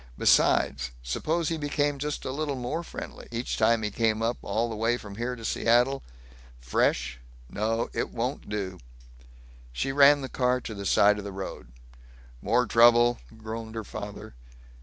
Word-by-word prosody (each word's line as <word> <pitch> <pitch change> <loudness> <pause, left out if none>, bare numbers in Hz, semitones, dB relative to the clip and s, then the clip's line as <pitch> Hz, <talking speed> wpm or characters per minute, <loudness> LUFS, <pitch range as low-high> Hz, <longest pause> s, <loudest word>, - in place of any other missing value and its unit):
Besides - - +3
suppose 155 - -1
he 165 - -1
became 145 -1 -1
just 150 +1 -3
a 130 - -2
little 145 0 -2
more 130 +6 -3
friendly, 170 - -9
each 120 +1 -3
time 115 -1 +3
he 105 - -1
came 110 0 0
up, 115 +2 -1
all 115 +2 -1
the 115 - -5
way 115 +3 +1
from 100 -4 -10
here 120 +2 -2
to 115 -2 -9
Seattle?... 120 +6 +2 0.6
Fresh.... 60 +1 0 0.3
No, 115 +2 -1
it - - -2
won't 125 +4 -4
do." 95 -3 -4 0.9
She - - -2
ran 140 +1 +6
the 135 - -4
car 125 -1 +1
to 115 - -7
the 100 -1 -5
side 105 +1 +4
of - - -6
the 100 - -6
road. 95 -9 -7 0.7
"More 125 0 +2
trouble?" 120 +1 +5 0.2
groaned 110 0 -7
her 110 - -3
father. 105 -8 -8
115 Hz, 165 wpm, -27 LUFS, 105-130 Hz, 0.9 s, ran